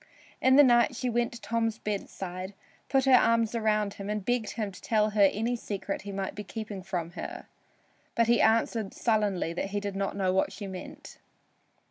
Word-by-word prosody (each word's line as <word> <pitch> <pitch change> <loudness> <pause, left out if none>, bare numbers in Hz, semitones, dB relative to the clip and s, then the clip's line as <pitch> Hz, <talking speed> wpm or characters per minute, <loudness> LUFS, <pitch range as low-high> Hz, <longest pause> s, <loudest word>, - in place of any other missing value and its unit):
In 260 0 +5
the 290 - +9
night 240 -1 +4
she 250 0 -2
went 235 0 +1
to 235 - -8
Tom's 225 -1 -1
bedside, 190 -3 -5 0.3
put 270 -1 +3
her 265 - +5
arms 230 -2 +4
around 215 -3 +1
him 200 0 -7
and 210 -2 -3
begged 245 -3 0
him 215 -3 -3
to 185 - -13
tell 215 -1 +1
her 205 -2 +5
any 230 +4 -1
secret 200 -3 -4
he 200 - -7
might 195 -1 -3
be 210 - -6
keeping 210 -1 -6
from 175 -2 -4
her. - - -7 0.7
But 230 - +4
he 235 +1 +3
answered 225 -2 +2
sullenly 205 -7 0
that 195 +3 -3
he 205 +1 -1
did 200 -1 -4
not 195 0 -2
know 185 -2 +1
what 190 - +1
she 205 - -7
meant. 190 -2 -9
210 Hz, 195 wpm, -28 LUFS, 195-230 Hz, 0.7 s, the